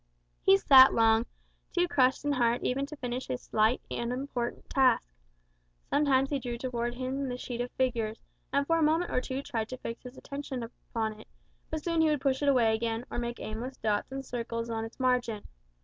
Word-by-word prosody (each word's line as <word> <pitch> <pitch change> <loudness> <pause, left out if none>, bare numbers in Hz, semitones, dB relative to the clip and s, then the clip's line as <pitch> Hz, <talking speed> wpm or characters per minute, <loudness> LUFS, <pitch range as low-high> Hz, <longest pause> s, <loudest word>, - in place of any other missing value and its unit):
He 195 - +6
sat 260 +4 +8
long, 225 0 +4 0.5
too 350 0 +4
crushed 265 -4 +2
in 290 - +2
heart 240 -3 +1
even 275 +2 0
to 305 - -8
finish 250 -2 -4
his 125 - -4
slight, 220 +3 +2
unimportant 245 0 -3
task. 260 - +3 0.8
Sometimes 275 -2 +3
he 280 - 0
drew 240 -2 -4
towards 240 -1 -3
him 260 +1 -2
the 245 - -3
sheet 245 -1 -4
of 245 - -3
figures, 230 -4 -1 0.3
and 280 0 +2
for 330 +2 +2
a - - +1
moment 320 +3 +2
or 250 - +1
two 265 +1 -4
tried 225 -4 -3
to 255 - -5
fix 230 -1 -6
his 250 +1 -11
attention 280 -3 -5
upon 225 -2 -5
it; - - -14 0.4
but 315 -1 -4
soon 335 -2 +1
he 320 - +4
would 300 -2 +1
push 270 -1 +1
it 285 - +3
away 235 -5 +4
again, 225 +1 -2
or - - -2
make 240 0 -4
aimless 240 +5 -5
dots 215 +2 -1
and 270 0 -5
circles 230 -1 -4
on 225 0 -2
its 225 - -11
margin. 245 -4 +1
250 Hz, 200 wpm, -29 LUFS, 230-270 Hz, 0.8 s, sat